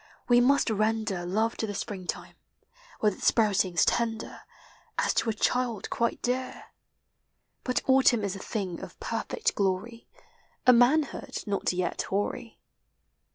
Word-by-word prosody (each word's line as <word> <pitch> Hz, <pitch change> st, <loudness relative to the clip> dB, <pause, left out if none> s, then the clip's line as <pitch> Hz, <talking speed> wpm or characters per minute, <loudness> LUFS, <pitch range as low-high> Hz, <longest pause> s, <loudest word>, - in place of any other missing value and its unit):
We 245 Hz, 0 st, +5 dB
must 275 Hz, -1 st, +3 dB
render 215 Hz, -4 st, 0 dB
Love 220 Hz, +5 st, 0 dB
to 220 Hz, -, -2 dB
the 205 Hz, -, -5 dB
Spring 190 Hz, -3 st, -5 dB
time, -, -, -5 dB, 0.7 s
with 210 Hz, -2 st, +3 dB
its -, -, -3 dB
sprouting? 200 Hz, -5 st, +2 dB
tender, 225 Hz, +6 st, 0 dB, 0.6 s
As -, -, +1 dB
to -, -, +1 dB
a -, -, +1 dB
child 240 Hz, -1 st, -1 dB
quite 235 Hz, 0 st, -1 dB
dear; 255 Hz, +1 st, -3 dB, 0.9 s
But 250 Hz, -, -1 dB
Autumn 260 Hz, -4 st, +4 dB
is 200 Hz, -1 st, -2 dB
a -, -, -7 dB
thing 190 Hz, -4 st, -4 dB
of -, -, -10 dB
perfect 465 Hz, -1 st, -2 dB
glory, 200 Hz, +4 st, -2 dB, 0.6 s
A 250 Hz, -, +8 dB
manhood 270 Hz, +5 st, +2 dB
not 200 Hz, -2 st, -1 dB
vet 180 Hz, 0 st, -1 dB
hoarv. 215 Hz, +4 st, -2 dB
225 Hz, 140 wpm, -28 LUFS, 200-245 Hz, 0.9 s, A